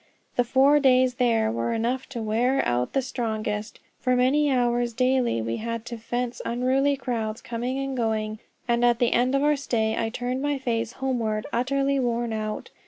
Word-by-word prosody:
The 245 - +3
four 270 +4 +4
days 255 -2 +4
there 225 -3 +3
were 235 +1 -1
enough 240 +3 -1
to 240 -4 -5
wear 245 +5 +1
out 120 +1 0
the 270 - +1
strongest; 215 -4 -3 0.2
for 255 -1 +1
many 275 +4 +3
hours 240 -2 +1
daily 250 - +1
we 115 +1 -2
had 230 0 -4
to 235 - -6
face 240 +2 -3
unruly 260 +4 +1
crowds 230 -4 -3
coming 245 +3 -3
and 270 -1 -3
going; 220 -2 -1 0.3
and 235 0 +1
at 240 -1 +4
the 240 0 +2
end 250 +3 +2
of 275 - +2
our 295 0 +4
stay 225 -6 0
I 225 - -1
turned 250 +2 -3
my 290 0 0
face 230 -3 -2
homeward 230 -5 -2
utterly 275 +3 +1
worn 240 -2 -1
out. 215 -1 -4
240 Hz, 180 wpm, -25 LUFS, 225-260 Hz, 0.3 s, four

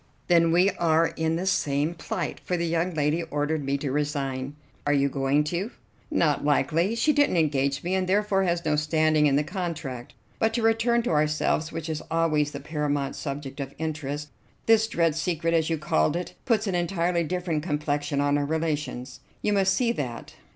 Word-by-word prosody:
"Then 170 -1 +5
we 180 +4 +4
are 165 -1 +3
in 160 0 0
the 175 +3 -2
same 150 -4 +1
plight, 165 - -4
for 180 - -1
the 170 - -1
young 170 +1 0
lady 150 +2 +1
ordered 150 -1 -2
me 140 +1 0
to 140 -1 -3
resign." 140 -2 -1
"And 135 +3 -6 0.3
are 145 - +3
you 140 0 +3
going 140 +2 +1
to?" 190 +6 -1 0.4
"Not 165 - +1
likely. 155 +8 +2
She 300 +6 +3
didn't 290 -10 +3
engage 140 -3 +1
me, 180 +2 -1
and 185 -1 0
therefore 200 0 +2
has 170 -1 -1
no 155 -1 +2
standing 155 0 +3
in 140 - +2
the 145 - +3
contract. 155 - -5 0.2
But, 225 0 +1
to 235 - 0
return 230 +1 +3
to - - -1
ourselves, 155 +1 +1
which 165 -1 -5
is 155 -1 -3
always 160 -3 +1
the - - -7
paramount 145 -3 -2
subject 140 -1 -6
of 140 0 -5
interest, 150 -2 -4 0.4
this 225 -1 +4
dread 165 -6 +1
secret, 165 0 -1
as 160 -1 +2
you 165 - 0
called 145 - +1
it, 175 +1 -4
puts 225 -3 +2
an 195 - -1
entirely 175 -1 0
different 175 -2 -2
complexion 150 -2 -1
on 145 0 +2
our 145 - 0
relations. 150 -5 -3 0.2
You 210 - +2
must 195 -1 +3
see 235 +3 +2
that. 125 - -5
160 Hz, 195 wpm, -26 LUFS, 145-175 Hz, 0.4 s, Then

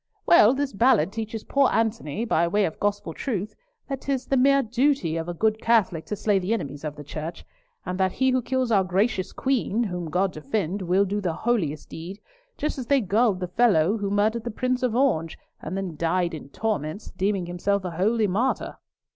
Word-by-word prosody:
Well, 255 -7 +6
this 280 0 -2
Ballard 200 -6 +3
teaches 225 -1 -5
poor 275 -2 +3
Antony, 225 -4 -1
by 170 -6 +2
way 205 +4 +2
of 160 - -5
gospel 205 -5 -1
truth, 215 - -3 0.3
that 275 -2 -4
'tis 270 -2 -2
the 275 - 0
mere 275 +1 +4
duty 245 - +1
of 165 +1 -3
a - - -2
good 220 +4 +1
Catholic 205 -8 +2
to 210 - -2
slay 205 -1 +1
the 190 +4 -1
enemies 145 -7 -6
of 150 -1 -4
the 150 - -9
church, 155 +3 -7 0.4
and 180 0 -4
that 190 -1 +2
he 260 0 +2
who 255 0 +2
kills 255 0 -1
our 195 -3 +4
gracious 190 +1 0
Queen, 240 -4 0
whom 180 -6 -4
God 180 +3 0
defend, 190 +4 -2
will 185 +2 +2
do 205 +2 -2
the 175 -4 -1
holiest 175 -9 -1
deed; 180 +5 -8 0.4
just 300 -2 -2
as 250 - -5
they 280 -1 +4
gulled 210 -2 +1
the 180 - -2
fellow, 195 -3 +3
who 205 -2 -2
murdered 215 +3 +1
the 240 - -3
Prince 255 +3 -1
of 250 -3 0
Orange, 195 - +1 0.2
and 180 +5 -4
then 190 -4 -4
died 170 +1 0
in 150 -3 -8
torments, 205 -1 -3
deeming 190 -1 -1
himself 185 +3 -1
a 180 - -3
holy 210 +6 +1
martyr." 215 +7 -1
205 Hz, 205 wpm, -25 LUFS, 175-235 Hz, 0.4 s, Well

